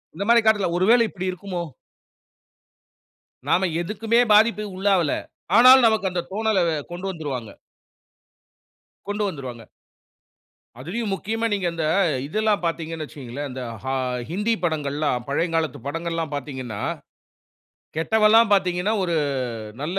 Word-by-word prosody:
இந்த 190 - -3
மாரி 235 0 +6
காட்றதுல 210 -4 +3
ஒருவேள 220 +7 +5
இப்டி 185 -1 -4
இருக்குமோ? 180 -1 -5 1.9
நாம 190 +1 +3
எதுக்குமே 215 +5 0
பாதிப்புக்கு 210 -2 +3
உள்ளாவல, 190 -5 +2 0.5
ஆனாலும் 255 +1 +8
நமக்கு 215 -4 +1
அந்த 175 -1 -2
தோணல 220 -1 +1 0.3
கொண்டு 175 +2 -6
வந்துருவாங்க. 140 - -5 1.6
கொண்டு 205 +1 -2
வந்துருவாங்க. 130 -9 -7 1.2
அதிலும் 200 - -4
முக்கியமா 225 +4 -2
நீங்க 195 -3 0
அந்த 165 -2 -3 0.4
இதெல்லாம் 215 +5 0
பாத்தீங்கன்னு 165 -1 -3
வச்சுக்கோங்களேன், 140 -1 -7
இந்த 130 0 -6 0.2
ஹா 130 0 -2 0.4
ஹிந்தி 210 +7 0
படங்கள்லாம் 145 -5 -1
பழையங் 165 +5 -1
காலத்து 155 -4 -1
படங்கள்லாம் 165 +1 -3
பாத்தீங்கன்னா, 130 -6 -6 1.2
கெட்டவன்லாம் 220 +5 +4
பாத்தீங்கன்னா, 185 +2 +1
ஒரு 170 -2 0 0.7
நல்ல 175 +6 -2
180 Hz, 110 wpm, -23 LUFS, 155-210 Hz, 1.9 s, ஆனாலும்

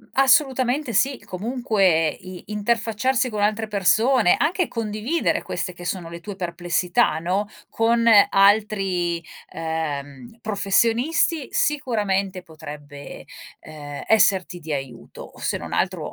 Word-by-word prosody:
Assolutamente 265 -1 +2
sì. 265 +5 +2
Comunque 195 - +1
i 185 +3 -10
interfacciarsi 230 +4 0
con 210 -3 -3
altre 215 +2 0
persone, 215 +2 +3
anche 355 +2 +1
condividere 225 +8 -1
queste 180 - -4
che 175 0 -11
sono 175 -1 -4
le 170 0 -8
tue 200 +3 -7
perplessità, 175 -3 0
no, 185 +5 -1 0.2
con 230 +1 +1 0.2
altri, 195 -4 +2 0.3
ehm, 145 - -5
professionisti, 230 - +1
sicuramente 205 -10 0
potrebbe, 150 -3 -10 0.3
ehm, 145 -2 -9
esserti 190 -4 +3
di 160 -1 -8
aiuto, 135 -4 -7
se - - -2
non - - -8
altro, - - -1
200 Hz, 110 wpm, -22 LUFS, 170-230 Hz, 0.3 s, persone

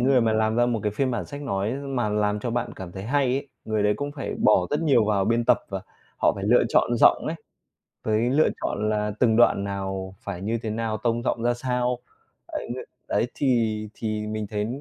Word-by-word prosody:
người 130 +1 +4
mà 115 -1 +2
làm 110 0 +1
ra 120 0 +4
một 115 -3 0
cái 105 - 0
phiên 130 +5 0
bản 120 - -2
sách 145 0 -7
nói 105 -4 -1
mà 135 -5 -2
làm 105 0 0
cho 120 - -2
bạn 120 +1 -2
cảm 90 -2 -8
thấy 95 - -7
hay 140 +6 +1
ấy, 135 +3 -1 0.2
người 110 -1 0
đấy 105 0 +3
cũng 145 0 -4
phải 145 - -4
bỏ 95 -4 +4
rất 150 +2 +1
nhiều 135 -8 +4
vào 105 -2 +2
biên 115 +3 +1
tập - - +5
và - - -4 0.4
họ - - +3
phải 100 -1 -5
lựa 120 +4 +5
chọn 120 +1 +2
giọng - - +5
ấy, - - -2 0.7
với 110 +2 +1
lựa 150 +4 +4
chọn 105 +1 -1
là 105 0 0
từng 115 -3 +4
đoạn 110 -4 +4
nào 95 -1 -4
phải 95 -3 -6
như 110 +3 -1
thế 110 - -3
nào, 110 0 -2
tông 120 0 +1
giọng 115 - -1
ra 120 +1 +2
sao. 125 0 -1 0.5
Ấy - - -5
ng 120 - -3 0.3
đấy - - +1
thì 115 -5 +1
thì 110 -1 -3
mình 110 0 -3
thấy 105 0 -2
110 Hz, 230 wpm, -25 LUFS, 105-125 Hz, 0.7 s, tập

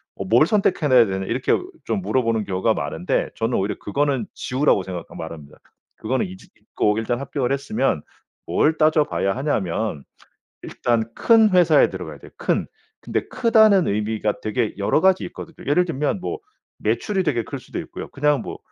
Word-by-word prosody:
어 - - -5
뭘 120 +10 +4
선택해나야 150 - +4
되냐?" 95 0 -3
이렇게 125 +6 -1 0.3
좀 195 - -2
물어보는 115 - 0
경우가 95 +4 +1
많은데 80 +3 -2
저는 115 +2 0
오히려 100 +2 -1
그거는 140 +4 -1
지우라고 130 -7 +1
생각 90 -3 -6
말합니다. 80 -3 -9 0.4
그거는 130 +4 -1
잊 95 +1 -10 0.2
잊고 105 0 -1
일단 120 +2 -1
합격을 135 -2 -2
했으면 135 - 0 0.4
뭘 160 +1 +2
따져봐야 155 -10 +2
하냐면 110 - -2 0.6
일단 120 -2 0
큰 225 -2 +5
회사에 175 -5 +5
들어가야 - - -7
돼요 - - -15
큰. - - 0 0.4
근데 - - -2
크다는 220 -7 +4
의미가 105 +1 -1
되게 110 +1 -1
여러 100 +10 +1
가지 190 -1 +3
있거든요 165 - -9
예를 180 +5 +4
들면 155 +3 -2
뭐 420 - -4 0.4
매출이 195 -2 0
되게 125 -8 0
클 - - -6
수도 - - -9
있고요. - - -7
그냥 150 0 +1
뭐 - - -7
125 Hz, 360 characters per minute, -22 LUFS, 105-155 Hz, 0.6 s, 큰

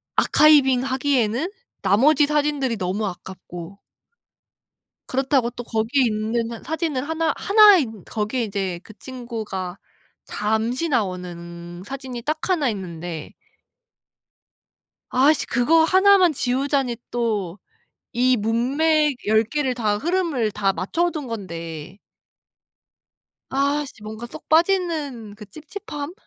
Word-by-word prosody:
아카이빙하기에는 265 - +3 0.3
나머지 290 +8 +4
사진들이 290 -5 0
너무 195 +3 -2
아깝고 180 0 -9 1.3
그렇다고 265 -2 +1
또 245 0 -8
거기에 230 +5 +1
있는 230 +1 -2
사진을 315 -4 -2
하나 320 -1 0
하나인 375 - +5
거기에 220 +3 -2
이제 195 -4 -3
그 - - -13
친구가 220 -7 -6 0.5
잠시 220 +8 -1
나오는 175 - -4
사진이 260 0 -7
딱 310 +5 -1
1 315 -7 +2
있는데 175 -6 -6 1.8
아씨 280 +4 +3
그거 320 +7 +3
1 380 +4 +6
만 360 -3 +4
지우자니 265 -1 0
또 210 -6 -2 0.6
이 250 +2 +3
문맥 275 +7 +1
10 220 +1 +4
개를 270 +1 -1
다 215 -4 0
흐름을 315 - 0
다 195 -1 0
맞춰 340 - -1
둔 300 -6 -5
건데 170 -5 -7 1.5
아씨 280 -3 -1
뭔가 220 +2 -7
쏙 310 +6 -11
빠지는 315 - +1
그 210 0 -11
찝찝함? 305 - -7
245 Hz, 220 characters per minute, -22 LUFS, 210-295 Hz, 1.8 s, 1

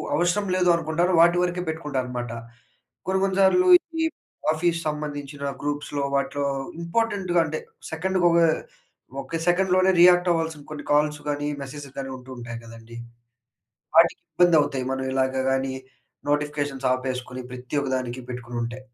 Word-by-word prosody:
అవసరం 175 +5 +1
లేదు 180 -1 +3
అనుకుంటానో 170 +2 0
వాటి 175 +1 +5
వరకే 180 0 -1
పెట్టుకుంటాన 150 -5 -2
అనమాట. 120 -2 -4 0.8
కొన్ని 190 0 +1
కొన్ని 195 0 -1
సార్లు 360 - +5
ఈ - - -25 0.2
ఈ - - +3 0.5
ఆఫీస్ 170 +1 0
సంబంధించిన 145 -1 -5 0.2
గ్రూప్స్‌లో 145 -1 -2
వాటిలో 140 +1 -1 0.4
ఇంపార్టెంట్‌గా 185 -1 0
అంటే, 155 0 -3 0.3
సెకండ్‌గొక, 175 0 +2 0.8
ఒక్క 165 - -4
సెకండ్‌లోనే 185 +1 +4
రియాక్టవ్వాల్సిన 170 -4 +4
కొన్ని 150 -1 -7
కాల్స్ 150 0 +2
గానీ, 145 0 -1 0.2
మెసేజెలు 140 0 -9
గాని 135 -1 -5
ఉంటూ 130 +1 -13
ఉంటాయి 115 -1 -7
గదండీ! 115 0 -12 1.0
వాటికి 165 0 +5
ఇబ్బందవుతాయి. 150 -7 +3
మనం 130 0 -3
ఇలాగ 130 0 +1
గాని 135 0 0 0.6
నోటిఫికేషన్స్ 145 -2 -1
ఆపేసుకొని 130 -1 -4
ప్రతి 125 +3 -5
ఒక్క 135 - -3
దానికి 125 0 -5
పెట్టుకునుంటే. 120 0 -5
150 Hz, 130 wpm, -24 LUFS, 130-175 Hz, 1.0 s, వాటి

